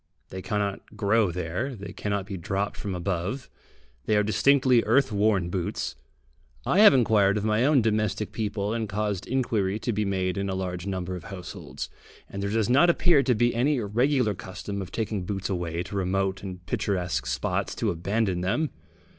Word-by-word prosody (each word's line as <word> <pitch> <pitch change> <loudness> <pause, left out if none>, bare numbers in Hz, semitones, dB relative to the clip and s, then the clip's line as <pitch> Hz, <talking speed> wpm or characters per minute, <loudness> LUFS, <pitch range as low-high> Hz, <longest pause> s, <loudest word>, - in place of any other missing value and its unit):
They 95 - -6
cannot 105 0 -3
grow 105 -1 +2
there, 90 +10 -3
they 100 -2 -8
cannot 100 -2 -2
be 100 -1 -6
dropped 95 +3 -2
from 100 -3 -4
above 90 +8 -3 0.6
they 105 - +3
are 105 - +3
distinctly 130 +3 +4
earth 130 +4 +3
worn 100 -4 +2
boots. 90 -2 -2 0.7
I 190 - +2
have 210 -9 +9
inquired 105 -5 +4
of 105 - -2
my 110 +3 +2
own 140 -4 +4
domestic 110 -1 0
people, 105 -1 -2
and 115 -2 -2
caused 105 -1 -2
inquiry 110 -6 0
to 115 +2 -2
be 105 +1 0
made 95 -2 -1
in 100 0 -2
a 95 - -1
large 90 -1 -4
number 95 -1 -3
of 90 - -8
households, 95 -4 -7 0.4
and 100 - -6
there 100 - -1
does 110 0 +1
not 140 +8 +5
appear 170 -3 +4
to 125 -2 +2
be 120 +2 +2
any 135 +4 +2
regular 120 +2 +1
custom 100 +2 -6
of 95 - -7
taking 110 -4 -2
boots 95 +1 -3
away 85 -2 -2
to 100 +3 -8
remote 95 0 0
and 90 -2 -8
picturesque 90 -7 -1
spots 60 +1 -1
to - - 0
abandon 95 +2 -1
them. 120 - 0
100 Hz, 180 wpm, -26 LUFS, 95-115 Hz, 0.7 s, have